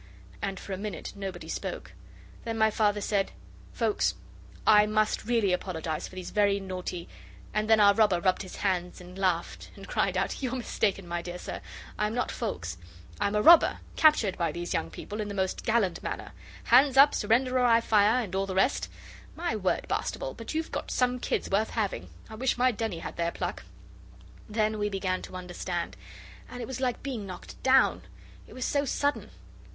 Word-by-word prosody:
And 195 -2 -3
for 195 - -6
a - - -3
minute 200 -5 -5
nobody 195 -3 -6
spoke. - - -5 0.5
Then 225 -1 -3
my 220 0 +4
Father 210 -1 +1
said, 200 -1 0 0.4
'Foulkes, 225 -3 +1 0.5
I 210 0 +6
must 215 0 +1
really 225 -5 +2
apologize 160 -4 -3
for - - -14
these 185 -1 -6
very 205 -1 +3
naughty 185 -2 -5 0.2
' - - -20
And 215 +1 0
then 220 -1 +6
our 200 -1 +7
robber 200 -4 +3
rubbed 185 +1 +1
his 185 - -8
hands 180 -3 -1
and 180 0 -12
laughed, 185 -3 -1
and - - -11
cried - - 0
out: - - -1
'You're 260 -1 -2
mistaken, 205 -6 -1
my 170 0 -2
dear 175 +1 -6
sir, - - -6 0.4
I'm 210 +2 0
not 245 - -1
Foulkes; 85 - -4 0.4
I'm 205 0 0
a 210 - +2
robber, 340 0 +7 0.2
captured 300 -13 +4
by 170 -2 +1
these 175 +2 -4
young 80 - -1
people 210 - -6
in 210 - -3
the 205 - -5
most 190 -1 -1
gallant 220 -6 +1
manner. - - -5 0.3
"Hands 265 +2 +5
up, 280 +2 +8
surrender, 255 +4 +2
or 250 - +3
I 230 -1 +6
fire," 220 +2 +3
and 195 - -8
all 195 +1 0
the 190 - -4
rest 195 +8 +2
of - - -21
it. - - -19 0.4
My 330 -9 -1
word, 190 -3 -1
Bastable, - - -2
but - - -7
you've 320 0 -2
got - - -4
some 250 0 +1
kids - - -1
worth 210 +3 +1
having! 200 - -2 0.2
I - - -11
wish 245 +4 0
my 250 +1 +4
Denny 225 -5 -3
had - - -7
their 170 0 0
pluck.' - - -4 0.8
Then 215 0 0
we 210 0 0
began 190 -2 -1
to - - -9
understand, 180 -1 -4 0.5
and 250 - -8
it 240 - -4
was 260 +2 -6
like 250 -2 -1
being 245 -7 -4
knocked 185 - -10
down, 265 0 +4 0.5
it - - -13
was 255 - -3
so 285 -1 +1
sudden. 285 +1 -1
210 Hz, 200 wpm, -28 LUFS, 185-235 Hz, 0.8 s, up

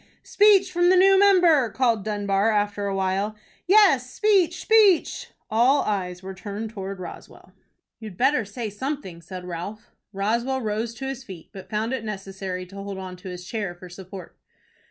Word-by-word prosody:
"Speech 400 -2 +4
from 350 0 +3
the 370 - +5
new 385 +1 +6
member!" 350 - +5
called 235 -5 +1
Dunbar, 205 0 0
after 205 -1 0
a 195 - -2
while. 195 +2 -1 0.3
"Yes, 360 -11 +5
speech, 370 0 +2
speech!" 425 -6 +3 0.2
All 245 +6 +3
eyes 185 -3 -3
were 190 0 -6
turned 205 +3 -6
towards 195 -2 -6
Roswell. 180 - -11 0.5
"You'd 215 -5 -9
better 260 0 +2
say 215 +1 -6
something," 210 - -5
said 180 +2 -9
Ralph. 180 +5 -7 0.2
Roswell 235 +6 -1
rose 220 +1 -3
to 265 - -6
his 265 -1 -5
feet, 185 -9 -11
but 195 -3 -11
found 220 +3 -2
it 260 -4 -3
necessary 195 -3 -6
to 190 +2 -15
hold 200 0 -6
on 185 -1 -7
to 185 +1 -9
his 180 0 -8
chair 200 -3 -4
for 180 +1 -12
support. 185 0 -10
215 Hz, 170 wpm, -24 LUFS, 190-265 Hz, 0.5 s, new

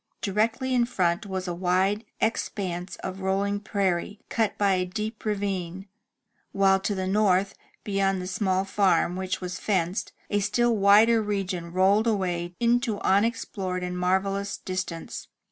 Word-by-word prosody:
Directly 225 +6 0
in 245 -1 +3
front 185 -3 0
was 190 -1 -4
a 175 - -2
wide 190 +4 +1
expanse 185 -5 -2
of 190 +1 -5
rolling 200 +2 0
prairie, 200 0 -1
cut 225 -3 0
by 200 -1 +3
a 185 -1 +1
deep 215 +5 -5
ravine, 195 -3 -2 0.7
while 195 -1 +4
to 200 +1 -2
the 190 -1 -2
north, 195 -1 +2 0.3
beyond 195 -2 0
the 180 - -5
small 190 0 0
farm 190 -3 +2
which 185 0 -3
was 180 0 -5
fenced, 185 -2 -1 0.2
a 205 - +2
still 230 +4 +2
wider 215 +3 +5
region 190 -5 -3
rolled 195 +5 +3
away 175 -5 -1
into 235 -2 +1
unexplored 195 -3 0
and 180 0 -3
marvellous 195 +2 0
distance. 180 -3 -5
195 Hz, 145 wpm, -26 LUFS, 185-210 Hz, 0.7 s, wider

